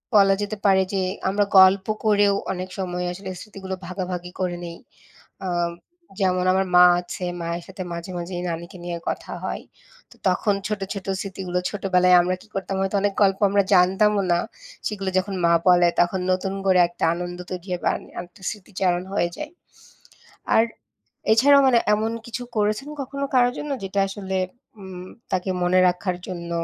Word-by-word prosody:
বলা 195 Hz, -1 st, +6 dB
যেতে 210 Hz, +1 st, -4 dB
পারে 190 Hz, -1 st, +5 dB
যে, 190 Hz, -, +1 dB, 0.3 s
আমরা 205 Hz, +1 st, +2 dB
গল্প 190 Hz, +1 st, +6 dB, 0.2 s
করেও 205 Hz, -1 st, +4 dB, 0.2 s
অনেক 185 Hz, 0 st, -5 dB
সময় 180 Hz, -1 st, -2 dB
আসলে 190 Hz, +1 st, -8 dB
স্মৃতিগুলো 190 Hz, -3 st, -7 dB
ভাগাভাগি 180 Hz, -1 st, -4 dB
করে 175 Hz, -1 st, -1 dB
নিই। 170 Hz, 0 st, -7 dB, 0.7 s
আ -, -, -2 dB, 0.7 s
যেমন 185 Hz, -1 st, +2 dB
আমার 190 Hz, 0 st, +2 dB
মা 180 Hz, 0 st, +9 dB, 0.2 s
আছে, 180 Hz, +1 st, -6 dB, 0.2 s
মায়ের 170 Hz, +1 st, -3 dB
সাথে 190 Hz, 0 st, -6 dB
মাঝে 170 Hz, +2 st, -6 dB
মাঝেই 175 Hz, +1 st, -5 dB
নানিকে 170 Hz, +3 st, -6 dB
নিয়ে 170 Hz, -1 st, -3 dB
কথা -, -, -5 dB
হয়, -, -, -4 dB, 0.5 s
তো -, -, -16 dB
তখন 200 Hz, +3 st, +1 dB
ছোটো, 205 Hz, -2 st, -2 dB
ছোটো 195 Hz, -1 st, -6 dB
স্মৃতিগুলো, 185 Hz, -2 st, -3 dB
ছোটোবেলায় 180 Hz, -3 st, +3 dB
আমরা 180 Hz, +1 st, 0 dB
কি -, -, -17 dB
করতাম 195 Hz, 0 st, -3 dB
হয়তো 195 Hz, +1 st, -1 dB
অনেক 205 Hz, -1 st, +1 dB
গল্প 195 Hz, 0 st, +2 dB
আমরা 200 Hz, 0 st, +3 dB
জানতামও 195 Hz, +3 st, +4 dB
না, 175 Hz, -, +2 dB, 0.5 s
সেগুলো 195 Hz, -2 st, -3 dB
যখন 195 Hz, +1 st, -4 dB
মা 170 Hz, -, +4 dB
বলে, 175 Hz, -1 st, +6 dB
তখন 180 Hz, +2 st, +1 dB
নতুন 190 Hz, +1 st, -1 dB
করে 185 Hz, -1 st, +4 dB
একটা 175 Hz, -, -7 dB
আনন্দ 175 Hz, 0 st, -5 dB
তৈরি 180 Hz, +1 st, -6 dB
হয় 180 Hz, -, -2 dB
বা -, -, +4 dB
আ -, -, -2 dB, 0.2 s
আরেকটা 175 Hz, +2 st, -10 dB
স্মৃতিচারণ 185 Hz, -4 st, -2 dB
হয়ে 175 Hz, -4 st, +1 dB
যায়। 305 Hz, +1 st, -6 dB, 1.0 s
আর 225 Hz, -, +6 dB, 0.7 s
এছাড়াও 280 Hz, +5 st, +6 dB
মানে 240 Hz, -2 st, +5 dB, 0.2 s
এমন 220 Hz, +2 st, -1 dB
কিছু 235 Hz, +1 st, -5 dB
করেছেন 215 Hz, +7 st, 0 dB
কখনো 280 Hz, +1 st, -4 dB
কারো 245 Hz, -1 st, +5 dB
জন্য, 295 Hz, -, -5 dB
যেটা 195 Hz, +1 st, -1 dB
আসলে 190 Hz, -1 st, -3 dB, 0.4 s
উম 185 Hz, -1 st, -9 dB, 0.3 s
তাকে 185 Hz, +1 st, 0 dB
মনে 180 Hz, +1 st, +3 dB
রাখার 180 Hz, 0 st, -1 dB
জন্য 170 Hz, -2 st, -6 dB
190 Hz, 170 wpm, -23 LUFS, 180-200 Hz, 1.0 s, মা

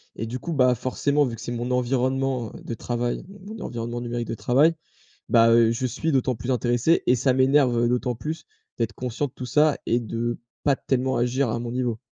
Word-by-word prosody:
et 115 Hz, -, -4 dB
du 125 Hz, +3 st, -4 dB
coup, 170 Hz, +5 st, -5 dB
bah, 130 Hz, -3 st, +4 dB
forcément, 140 Hz, +4 st, +1 dB
vu 120 Hz, -3 st, -4 dB
que 110 Hz, -, -11 dB
c'est -, -, -5 dB
mon 120 Hz, +1 st, -3 dB
environnement, 130 Hz, -1 st, 0 dB
heu, -, -, -10 dB
de 115 Hz, -, -5 dB
travail, 120 Hz, +1 st, -2 dB
donc 195 Hz, 0 st, -14 dB, 0.2 s
mon 200 Hz, -, -6 dB
environnement 120 Hz, 0 st, -4 dB
numérique 120 Hz, 0 st, -3 dB
de -, -, -3 dB
travail, 145 Hz, +9 st, +3 dB, 0.5 s
bah, 115 Hz, -1 st, +6 dB
heu, 115 Hz, -1 st, +5 dB
je 130 Hz, +2 st, -1 dB
suis 160 Hz, +6 st, -2 dB
d'autant 130 Hz, -2 st, +1 dB
plus 125 Hz, +4 st, -3 dB
intéressé 120 Hz, +6 st, +2 dB
et 125 Hz, -, +5 dB
ça 130 Hz, +1 st, +2 dB
m'énerve, 130 Hz, -1 st, +4 dB
heu, 120 Hz, 0 st, +2 dB
d'autant 125 Hz, 0 st, 0 dB
plus 155 Hz, +7 st, -5 dB, 0.3 s
d'être 115 Hz, -1 st, -1 dB
conscient 125 Hz, +3 st, -3 dB
de 125 Hz, -, -16 dB
tout 125 Hz, -, -7 dB
ça 150 Hz, +3 st, +3 dB
et 120 Hz, -, +2 dB
de 120 Hz, +1 st, -3 dB, 0.3 s
pas 140 Hz, -2 st, +3 dB
tellement 130 Hz, 0 st, 0 dB
agir 125 Hz, +1 st, +1 dB
à 115 Hz, -, -1 dB
mon 120 Hz, 0 st, -4 dB
niveau. 120 Hz, -3 st, -1 dB
125 Hz, 225 wpm, -24 LUFS, 120-135 Hz, 0.5 s, bah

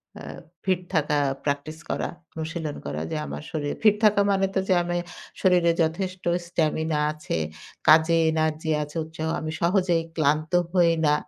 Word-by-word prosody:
অ্যা -, -, -10 dB, 0.4 s
fit 185 Hz, -2 st, +2 dB
থাকা 150 Hz, -2 st, +1 dB, 0.3 s
practice 145 Hz, +2 st, -2 dB
করা, -, -, -1 dB, 0.2 s
অনুশীলন 160 Hz, -1 st, -4 dB
করা। 75 Hz, +2 st, -3 dB
যে -, -, -2 dB
আমার -, -, -6 dB
শরী 150 Hz, -2 st, -3 dB, 0.2 s
ফিট 210 Hz, -1 st, +6 dB
থাকা 205 Hz, -1 st, +5 dB
মানে 195 Hz, 0 st, +2 dB
তো -, -, +3 dB
যে 190 Hz, -, +4 dB
আমি 175 Hz, 0 st, -2 dB, 0.5 s
শরীরে 180 Hz, -3 st, +4 dB
যথেষ্ট 185 Hz, +3 st, -3 dB, 0.2 s
স্টামিনা 160 Hz, -2 st, 0 dB
আছে, 155 Hz, -, -5 dB, 0.5 s
কাজে 160 Hz, +2 st, +6 dB, 0.2 s
এনার্জি 160 Hz, 0 st, -1 dB
আছে, 150 Hz, +1 st, -7 dB
উৎসাহ, 160 Hz, 0 st, -5 dB
আমি 155 Hz, 0 st, -4 dB
সহজেই 175 Hz, -1 st, +2 dB
ক্লান্ত 155 Hz, 0 st, +1 dB, 0.2 s
হই 175 Hz, -2 st, +5 dB
না। 150 Hz, -, +4 dB
160 Hz, 155 wpm, -25 LUFS, 155-175 Hz, 0.5 s, ফিট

